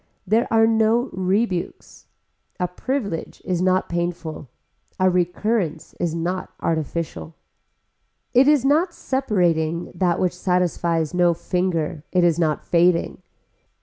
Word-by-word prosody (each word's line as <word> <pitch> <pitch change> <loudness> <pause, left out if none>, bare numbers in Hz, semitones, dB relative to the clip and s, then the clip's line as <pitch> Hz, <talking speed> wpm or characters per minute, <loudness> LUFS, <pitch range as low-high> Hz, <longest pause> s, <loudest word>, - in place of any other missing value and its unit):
There 220 +6 +2
are 225 0 +5
no 225 +3 +2
rebukes. 190 0 -2 0.5
A 180 - +1
privilege 200 -1 -4
is 180 -2 -1
not 185 0 +2
painful. 170 -4 -4 0.5
A 185 0 +4
recurrence 180 -1 -1
is 170 -2 -1
not 180 +3 -3
artificial. 160 0 -3 1.0
It 260 +2 +5
is 295 -3 +4
not 325 +5 +2
separating 175 - 0
that 175 0 0
which 180 -1 +1
satisfies 175 -3 0
no 175 -1 +3
finger, 170 -4 -2
it 180 -1 +3
is 170 -1 +3
not 155 -3 0
fading. 175 0 +2
180 Hz, 115 wpm, -22 LUFS, 170-215 Hz, 1.0 s, are